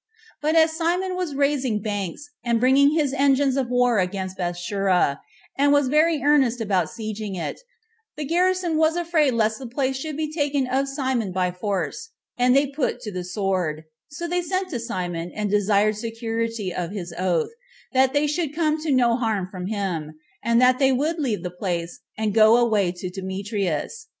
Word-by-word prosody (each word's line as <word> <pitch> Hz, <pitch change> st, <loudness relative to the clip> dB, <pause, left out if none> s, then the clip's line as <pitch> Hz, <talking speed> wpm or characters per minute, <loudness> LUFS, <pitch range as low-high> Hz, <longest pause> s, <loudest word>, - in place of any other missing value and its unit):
But 310 Hz, +2 st, +1 dB
as 320 Hz, 0 st, +5 dB
Simon 355 Hz, +3 st, 0 dB
was 360 Hz, -6 st, -3 dB
raising 275 Hz, -5 st, +1 dB
banks, 205 Hz, -, -4 dB, 0.2 s
and 235 Hz, -1 st, +1 dB
bringing 275 Hz, +4 st, +5 dB
his 290 Hz, -4 st, +1 dB
engines 275 Hz, -1 st, +3 dB
of 265 Hz, -3 st, -1 dB
war 245 Hz, -3 st, +3 dB
against 190 Hz, 0 st, -2 dB
Bethsura, 180 Hz, -3 st, 0 dB, 0.4 s
and 285 Hz, +1 st, +3 dB
was 285 Hz, -2 st, +3 dB
very 310 Hz, +1 st, +3 dB
earnest 270 Hz, -5 st, +3 dB
about 195 Hz, -6 st, +1 dB
the -, -, -12 dB
siege 215 Hz, -1 st, -5 dB
of 205 Hz, -3 st, -4 dB
it, 170 Hz, -, -4 dB, 0.6 s
the 300 Hz, -, -3 dB
garrison 355 Hz, +1 st, +1 dB
was 315 Hz, +1 st, +3 dB
afraid 325 Hz, -6 st, +2 dB
lest 220 Hz, -1 st, +1 dB
the 260 Hz, -, -7 dB
place 265 Hz, +2 st, -1 dB
should 295 Hz, +2 st, -5 dB
be 310 Hz, -1 st, -3 dB
taken 290 Hz, -3 st, 0 dB
of 265 Hz, +2 st, 0 dB
Simon 260 Hz, -7 st, -1 dB
by 180 Hz, 0 st, 0 dB
force, 185 Hz, -, -3 dB, 0.3 s
and 250 Hz, +1 st, +3 dB
they 280 Hz, +1 st, +5 dB
put 280 Hz, 0 st, -2 dB
to 210 Hz, -, -6 dB
the 180 Hz, -2 st, -4 dB
sword; 180 Hz, -4 st, -2 dB, 0.2 s
so 340 Hz, +4 st, -6 dB
they 355 Hz, +1 st, 0 dB
sent 370 Hz, +2 st, -2 dB
to 245 Hz, -, -2 dB
Simon, 180 Hz, -7 st, -4 dB
and 210 Hz, -2 st, -2 dB
desired 210 Hz, +1 st, +3 dB
the 210 Hz, -, -8 dB
security 225 Hz, -3 st, -3 dB
of 175 Hz, -1 st, -3 dB
his 180 Hz, -4 st, -6 dB
oath, 180 Hz, -, 0 dB, 0.4 s
that 260 Hz, 0 st, +4 dB
they 290 Hz, +1 st, +2 dB
should 300 Hz, 0 st, -2 dB
come 310 Hz, -1 st, +1 dB
to 310 Hz, -1 st, -1 dB
no 245 Hz, -3 st, +4 dB
harm 220 Hz, -6 st, -1 dB
from 185 Hz, -1 st, -5 dB
him, 180 Hz, -7 st, -3 dB, 0.3 s
and 235 Hz, +1 st, +3 dB
that 255 Hz, 0 st, +4 dB
they 270 Hz, -1 st, +4 dB
would 305 Hz, +6 st, 0 dB
leave 240 Hz, -10 st, -1 dB
the 180 Hz, -, -4 dB
place, 175 Hz, -2 st, -4 dB, 0.2 s
and 215 Hz, -2 st, -1 dB
go 220 Hz, +1 st, +6 dB
away 215 Hz, -6 st, +2 dB
to 180 Hz, 0 st, -6 dB
Demetrius. 195 Hz, -, -3 dB
235 Hz, 190 wpm, -23 LUFS, 195-290 Hz, 0.6 s, go